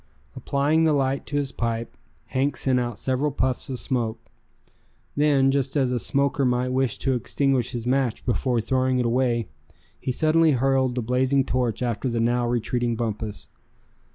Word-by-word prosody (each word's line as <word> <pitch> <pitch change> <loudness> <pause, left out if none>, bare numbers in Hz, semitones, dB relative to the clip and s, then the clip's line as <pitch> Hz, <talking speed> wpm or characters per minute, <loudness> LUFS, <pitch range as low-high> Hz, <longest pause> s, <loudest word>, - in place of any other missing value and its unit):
Applying 145 +3 +1
the 160 -1 +3
light 135 -1 0
to 145 - -4
his 140 -2 0
pipe, 115 -1 -3 0.3
Hank 135 +2 0
sent 130 -2 +2
out 120 -3 -3
several 130 +5 0
puffs 130 -2 -2
of 130 - -3
smoke. 120 -4 -1 1.0
Then, 140 -2 +3
just 135 0 -1
as 130 -3 +2
a 125 - 0
smoker 140 +3 +1
might 125 0 +1
wish 130 -1 0
to 135 - 0
extinguish 130 0 0
his 120 -1 -4
match 130 -2 0
before 120 -1 0
throwing 130 +2 +1
it 125 - +1
away, 120 -2 +1 0.5
he 130 - -2
suddenly 155 +3 +3
hurled 130 0 +1
the 125 - -1
blazing 130 +3 +2
torch 125 -2 -1
after 120 +1 -1
the 115 -1 -1
now 120 +1 +1
retreating 120 0 -1
Bumpus. 110 -2 -4
130 Hz, 165 wpm, -24 LUFS, 120-135 Hz, 1.0 s, the